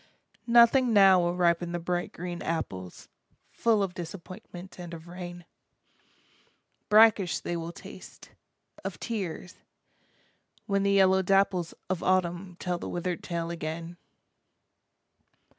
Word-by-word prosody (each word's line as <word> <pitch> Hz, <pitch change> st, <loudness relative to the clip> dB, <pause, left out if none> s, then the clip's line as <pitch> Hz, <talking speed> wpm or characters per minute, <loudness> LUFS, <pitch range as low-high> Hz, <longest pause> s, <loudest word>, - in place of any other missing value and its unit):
Nothing 235 Hz, +1 st, +5 dB
now 195 Hz, -3 st, +7 dB
will 175 Hz, 0 st, 0 dB
ripen 175 Hz, -1 st, +1 dB
the 175 Hz, -, -2 dB
bright 175 Hz, +1 st, -2 dB
green 175 Hz, 0 st, -6 dB
apples, 95 Hz, -, -5 dB, 0.4 s
Full 220 Hz, -3 st, +2 dB
of 185 Hz, -2 st, -3 dB
disappointment 180 Hz, +1 st, -9 dB
and 175 Hz, -1 st, -7 dB
of 165 Hz, +1 st, -12 dB
rain, 175 Hz, 0 st, -8 dB, 1.4 s
Brackish 210 Hz, -4 st, +5 dB
they 175 Hz, -, -4 dB
will 165 Hz, 0 st, -4 dB
taste, -, -, -13 dB, 0.5 s
of -, -, -5 dB
tears, 185 Hz, -5 st, -5 dB, 1.1 s
when 200 Hz, -1 st, +1 dB
the 200 Hz, 0 st, +2 dB
yellow 190 Hz, -1 st, +5 dB
dapples 190 Hz, -2 st, +1 dB
Of 185 Hz, -2 st, -2 dB
Autumn 180 Hz, 0 st, 0 dB
tell 180 Hz, -1 st, -2 dB
the -, -, -6 dB
withered 175 Hz, 0 st, -3 dB
tale 170 Hz, -1 st, -3 dB
again. 165 Hz, +1 st, -5 dB
180 Hz, 120 wpm, -28 LUFS, 170-195 Hz, 1.4 s, now